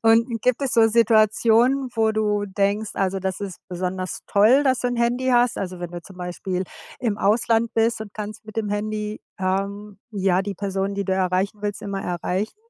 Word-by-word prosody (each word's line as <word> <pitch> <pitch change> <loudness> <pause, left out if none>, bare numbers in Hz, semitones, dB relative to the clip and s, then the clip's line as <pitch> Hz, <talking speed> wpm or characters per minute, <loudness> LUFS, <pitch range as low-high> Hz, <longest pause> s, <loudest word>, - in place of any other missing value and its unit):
Und 230 0 +3
gibt 250 +2 +1
es 270 - 0
so 225 -1 +5
Situationen, 230 +3 +4
wo 220 -1 +2
du 210 -1 0
denkst, 200 +2 0
also, 195 0 0
das 190 0 -3
ist 195 -3 -5
besonders 185 0 -3
toll, 220 +8 +5
dass 260 -2 +2
du - - 0
'n 245 - -2
Handy 240 +2 +1
hast? 245 -1 +3
Also 185 -2 -5
wenn 175 -1 -5
du 175 -1 -7
zum 190 +2 -14
Beispiel 180 +1 -3 0.3
im 220 -4 -1
Ausland 225 +2 +2
bist 225 0 +2
und 215 -2 -8
kannst 215 +1 -6
mit 215 0 -12
dem 220 -2 -1
Handy, 210 +1 -3 0.2
ähm, 195 +2 -2
ja 190 -3 +1
die 200 0 -4
Person, 195 0 -2
die 200 0 -2
du 190 - -1
erreichen 190 +2 0
willst, 205 -1 -3
immer 195 -1 -4
erreichen? 180 - -2
210 Hz, 195 wpm, -23 LUFS, 190-225 Hz, 0.3 s, so